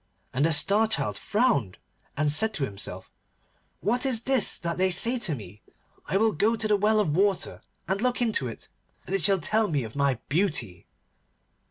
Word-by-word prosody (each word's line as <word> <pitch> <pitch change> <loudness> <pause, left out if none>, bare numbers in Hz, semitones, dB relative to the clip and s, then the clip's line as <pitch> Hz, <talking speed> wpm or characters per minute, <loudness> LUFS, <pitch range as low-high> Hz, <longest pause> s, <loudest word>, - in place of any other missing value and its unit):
And 135 +2 0
the - - 0
Star 200 +9 +3
Child 220 - -2
frowned 210 - 0 0.4
and 150 0 +1
said 220 +8 +2
to 150 - -2
himself, 100 -5 -6 0.7
'What 235 +8 0
is 255 -5 +2
this 265 -3 +2
that 170 0 -4
they 190 0 +3
say 230 +8 +3
to 180 -10 -1
me? 105 -3 -11 0.5
I 195 - +1
will 220 +2 +3
go 215 +7 +1
to 220 -1 -2
the 210 - +3
well 215 +2 +2
of 160 -8 0
water 195 0 0 0.3
and 190 +3 -1
look 250 0 0
into 220 - 0
it, 115 - -9 0.4
and 190 - -6
it 195 - +1
shall 195 +2 +4
tell 215 +4 +1
me 145 -7 -1
of 110 +2 -9
my 140 -2 +1
beauty. 135 - -1
195 Hz, 190 wpm, -26 LUFS, 145-220 Hz, 0.7 s, shall